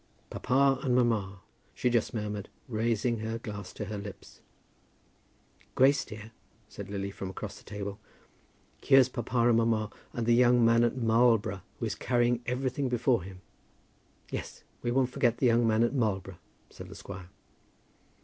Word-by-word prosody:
"Papa 135 +1 +2
and 125 -2 +1
mamma," 105 -6 +1 0.3
she 125 - +1
just 120 -2 +1
murmured, 105 -2 -4 0.2
raising 115 0 0
her 110 +1 -3
glass 105 -4 -7
to 105 - -5
her 105 +1 -5
lips. 100 -1 -10 1.3
"Grace, 140 +2 +4
dear," 105 +1 -10 0.4
said 100 -2 -9
Lily 100 -1 -3
from 95 -1 -6
across 100 +1 -7
the - - -19
table, 100 0 -6 0.8
"here's 135 -2 +6
papa 120 -1 0
and 120 -2 +4
mamma, 115 -2 +1 0.2
and 120 - -3
the 120 - +4
young 120 0 +5
man 115 +1 +5
at 120 +2 +1
Marlborough 115 -4 +3 0.2
who - - -3
is - - -2
carrying 120 -1 +1
everything 130 +2 -1
before 120 -2 +2
him." 95 +1 -10 0.9
"Yes; - - -6 0.2
we 120 - -2
won't 130 +1 +1
forget 125 -4 +1
the 130 - +1
young 120 -1 +4
man 110 +1 +3
at 120 - +1
Marlborough," 95 -8 -1 0.3
said - - -10
the - - -10
squire. 95 -2 -9
115 Hz, 160 wpm, -29 LUFS, 105-125 Hz, 1.3 s, here's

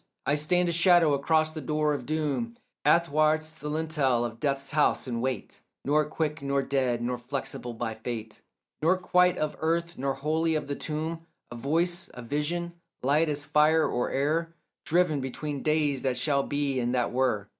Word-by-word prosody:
I 140 - +2
stand 175 +4 +2
a - - +1
shadow 170 -2 +5
across 155 +3 +2
the 155 -1 -6
door 150 +2 0
of 130 -4 -5
doom, 155 - -1 0.3
Athwart 155 -2 +3 0.2
the 150 +2 -5
lintel 150 -6 +1
of 115 -1 -6
death's 135 -2 -1
house, 150 0 +2
and 120 -3 -3
wait; 130 0 -4 0.2
Nor 150 +2 +3
quick 155 0 -2
nor 140 0 0
dead, 130 -4 0
nor 125 0 -2
flexible 125 -1 -5
by 115 -1 -3
fate, 110 -1 -6 0.4
Nor 175 +4 +3
quite 180 0 +3
of 155 -1 -2
earth 170 +1 -1
nor 135 0 -1
wholly 160 +3 0
of 155 - -2
the 140 - -2
tomb; 160 +3 -4 0.2
A - - -6
voice, 170 +8 -1
a 125 - -8
vision, 165 +7 -2 0.3
light 150 +4 +3
as 145 -1 -2
fire 150 +2 +4
or 120 - -1
air, 160 +4 0 0.3
Driven 165 -4 +2
between 140 +2 -4
days 150 -3 +1
that 130 -2 0
shall 140 +2 +2
be 140 -1 -1
and 120 +1 0
that 120 -1 0
were. 120 -5 0
150 Hz, 175 wpm, -28 LUFS, 130-160 Hz, 0.4 s, shadow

